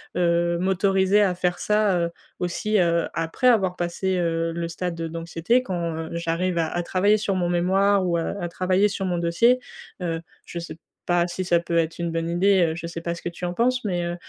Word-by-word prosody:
heu, 170 -1 +2
m'autoriser 190 +2 +2
à 195 -3 +3
faire 180 -1 -1
ça, 210 -2 +2
heu, 170 0 -1 0.3
aussi, 195 +4 -1
heu, 170 -2 +2
après 165 +10 0
avoir 195 -7 +3
passé, 180 +2 -1
heu, 165 -1 0
le 170 0 -3
stade 170 0 -4
d'anxiété 165 +8 0
quand, 170 -6 -3
heu, 160 0 -5
j'arrive 170 +1 -1
à 160 - +1
à 175 +2 -2
travailler 200 +4 +2
sur 205 -1 -1
mon 175 -2 0
mémoire 190 +2 +2
ou 170 -1 +1
heu, 165 - -3
à 175 - -2
travailler 185 +4 +1
sur 195 -1 -3
mon 175 -1 -1
dossier. 230 +10 +3 0.4
Heu, 165 -1 -2 0.2
je 170 - -6
sais 170 -1 -8 0.3
pas 175 0 +2
si 180 +1 -4
ça 175 -1 +3
peut 170 0 -4
être 165 0 0
une 170 -1 -2
bonne 165 0 -1
idée, 190 +2 +3
heu, - - -4
je 170 0 -5
sais 165 0 -6
pas 170 0 -2
ce 170 - -9
que - - -5
tu 175 +1 -8
en 175 0 -1
penses, 250 +4 +1
mais, 180 -4 -1
heu 175 - -3
175 Hz, 225 wpm, -24 LUFS, 170-190 Hz, 0.4 s, à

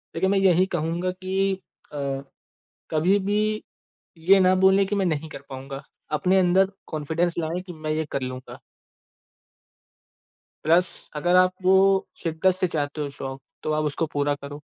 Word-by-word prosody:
देखिए 190 +3 +1
मैं 200 - +2
यही 185 -1 +4
कहूँगा 175 +2 -1
कि 190 +1 -1 0.4
अ, - - -5 0.9
कभी 175 +6 +3
भी 205 +1 +1 0.8
ये 190 +4 +5
ना 185 0 +5
बोले 195 +1 +5
कि 205 - -2
मैं 195 -2 +1
नहीं 160 -2 -1
कर 140 - -9
पाऊँगा। 135 +1 -7 0.4
अपने 190 +3 +3
अंदर 190 +2 +3 0.2
कॉन्फिडेंस 160 +3 -1
लाएँ, 165 +2 -2
कि 180 -2 -9
मैं 155 -1 -4
ये 155 0 -1
कर 140 - -2
लूँगा। 130 0 -7 2.1
प्लस 170 +3 +4 0.3
अगर 175 +4 +2
आप 185 0 +5
वो 190 +1 +5 0.5
शिद्दत 170 +3 +1
से 185 -1 0
चाहते 150 -1 -3
हो 145 - -2
शौक, 135 -1 -7 0.2
तो 155 - -1
आप 155 0 +1
उसको 150 +2 -1
पूरा 145 0 +1
करो। 145 +1 -9
170 Hz, 160 wpm, -24 LUFS, 150-185 Hz, 2.1 s, ये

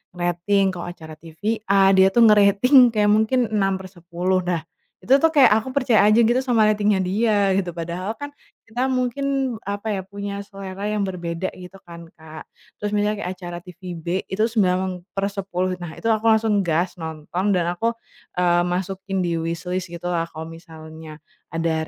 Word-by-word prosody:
ngerating, 175 +3 +1
kalau 175 -1 -7
acara 160 -3 -9
TV 160 0 -15 0.3
A, 195 -1 +5
dia 190 0 +6
tuh 235 - +6
ngerating 210 +5 +4 0.2
kayak 210 -1 +3
mungkin 220 +4 +2
6/10. 185 -3 -1
Nah, 170 -3 -1 0.3
itu 225 +8 +1
tuh 325 - +5
kayak 275 -6 +7
aku 260 - -7
percaya 245 -6 +3
aja, 215 +2 +4
gitu, 240 +3 +3
sama 245 -4 +2
ratingnya 210 -1 +2
dia, 200 +1 +1
gitu. 190 -2 0
Padahal 175 +6 -4
kan 285 0 -7 0.3
kita 245 +4 -2
mungkin, 260 0 -1
apa 205 +2 -5
ya, 195 - -2
punya 200 +1 -6
selera 195 0 -6
yang 210 -2 0
berbeda 175 -1 -4
gitu, 185 +1 -12
kan, 170 -1 -11
Kak. 160 0 -12 0.3
Terus 210 - -1
misalnya 210 0 0
kayak 180 - -3
acara 175 -1 -7
TV 180 +1 -15
B, 165 0 -10 0.2
itu 190 +3 -4
9/10. 185 -1 -1
Nah 175 -3 -8
itu 230 - -3
aku 220 0 +1
langsung 220 -1 +3
gas, 170 +3 0
nonton, 165 +4 -2
dan 180 -2 +1
aku, 230 +3 0 0.5
eee, 175 -1 +3
masukin 190 +2 -3
di 170 -2 -1
wishlist 170 +3 -3
gitulah, 170 -1 -2
kalau 160 +1 -7
misalnya 160 -2 -12 0.3
ada 165 0 0
190 Hz, 165 wpm, -22 LUFS, 175-210 Hz, 0.5 s, kayak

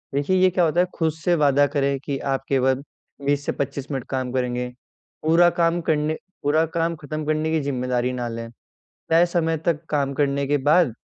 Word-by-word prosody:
देखिए 145 +7 +1
ये 185 0 +5
क्या 180 0 +1
होता 165 +2 +1
है - - +3
खुद 160 -2 +1
से 170 +2 0
वादा 145 -2 +4
करें 140 -1 0
कि 140 - -2
आप 135 -1 -2
केवल 130 0 +2 0.4
20 145 0 +1
से - - 0
25 140 +1 -4
मिनट 135 -3 -2
काम 130 -2 -2
करेंगे, 125 -1 -1 0.5
पूरा 170 +2 +5
काम 170 +1 +2
करने 155 0 0 0.3
पूरा 155 +3 +3
काम 165 +1 -1
ख़त्म 155 +1 -5
करने 155 +1 0
की 160 - +2
ज़िम्मेदारी 125 -2 -1
ना 120 -1 -3
लें। 115 0 -6 0.6
तय 165 +2 +5
समय 165 -2 0
तक 165 -1 0
काम 140 -2 0
करने 140 0 0
के 145 0 +2
बाद 145 -1 +3
145 Hz, 195 wpm, -23 LUFS, 135-160 Hz, 0.6 s, ये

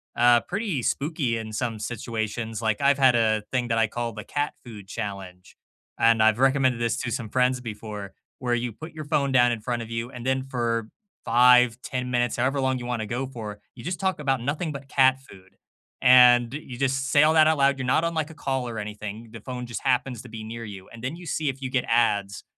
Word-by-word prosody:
uh, 120 0 +5
pretty 195 - -3
spooky 140 -3 -1
in 110 -1 -6
some 115 +1 -2
situations, 110 0 -4
like, 110 -2 0
I've 140 0 +3
had 130 -2 +5
a 110 -2 +2
thing 125 -2 0
that 115 -1 0
I 115 -1 +3
call 120 +1 -4
the 105 0 -7
Cat 145 0 -2
Food 105 -5 -11
Challenge, 95 -4 -7 0.4
and 115 -1 +4
I've 110 +1 +4
recommended 130 -2 +3
this 115 -1 0
to 120 - -3
some 120 -2 -3
friends 125 +2 +2
before, 105 -4 -7 0.3
where 125 -2 0
you 120 -1 -3
put 155 +7 -9
your 155 -2 -8
phone 140 -1 +1
down 125 -2 +4
in 115 - -5
front 120 +1 -2
of 115 - -8
you, 115 +2 -4
and 125 -1 -9
then 130 0 0
for 115 -4 -2 0.3
5, 125 0 +5
10 125 -1 -4
minutes, 120 -1 +1
however 130 +3 0
long 130 -1 +1
you 125 - -7
wanna 120 -3 -2
go 125 +5 -3
for, 110 -5 -8
you - - -12
just 180 +2 -3
talk 190 -3 0
about 135 -4 0
nothing 150 +6 -2
but 140 0 -9
cat 130 -1 +4
food, 95 -7 -17 0.5
and 125 -1 +7
you 140 -4 -7
just 135 0 0
say 145 +2 +5
all 155 - +4
that 155 -1 +6
out 160 - +3
loud, 140 0 +3
you're 130 - -3
not 135 +5 +2
on 170 0 0
like 160 -1 -2
a - - -10
call 135 -4 -2
or 115 -2 -5
anything, 105 +1 -7
the 115 - -9
phone 125 +3 -6
just 120 -1 -6
happens 125 -2 0
to - - -12
be 110 0 -8
near 115 +1 -7
you, 100 -3 -10
and 115 - -12
then 130 +6 -3
you 175 +1 -11
see 155 -1 -2
if 135 0 -3
you 130 - -3
get 130 -1 0
ads 105 -4 +1
120 Hz, 235 wpm, -25 LUFS, 115-135 Hz, 0.5 s, and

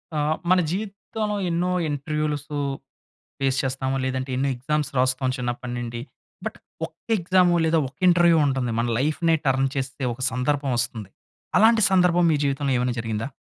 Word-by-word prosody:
ఆ! - - +1 0.3
మన 185 - +5
జీవితంలో 210 +1 -3
ఎన్నో 175 +2 0 0.2
ఇంటర్‌వ్యూ‌లసు 150 0 -2 0.8
ఫేస్ 135 -1 +1
చేస్తాము. 130 0 -1
లేదంటే 130 0 -2
ఎన్నో 140 +1 +1
ఎగ్జామ్స్ 150 +4 -2
రాస్తాం 130 +1 +1
చిన్నప్పటినుండి. 120 -1 -4 0.4
బట్ - - -4 0.3
ఒక్క - - -14 0.2
ఎగ్జాము 180 -1 +3
లేదా 160 0 +3
ఒక్క 135 - -16
ఇంటర్‌వ్యూ 175 -1 +5
ఉంటుంది. 130 -3 -1
మన 120 - +1
లైఫ్‌నే 155 +4 +2
టర్న్ 135 0 +2
చేస్తే 135 0 -4
ఒక 125 - -11
సందర్భం 135 +3 0
వస్తుంది. 115 -4 -3 0.5
అలాంటి 225 +1 +5
సందర్భం 180 -2 +4
మీ - - +3
జీవితంలో 140 0 0
ఏమైనా 125 0 0
జరిగిందా? 110 +1 -3
140 Hz, 145 wpm, -24 LUFS, 130-170 Hz, 0.8 s, మన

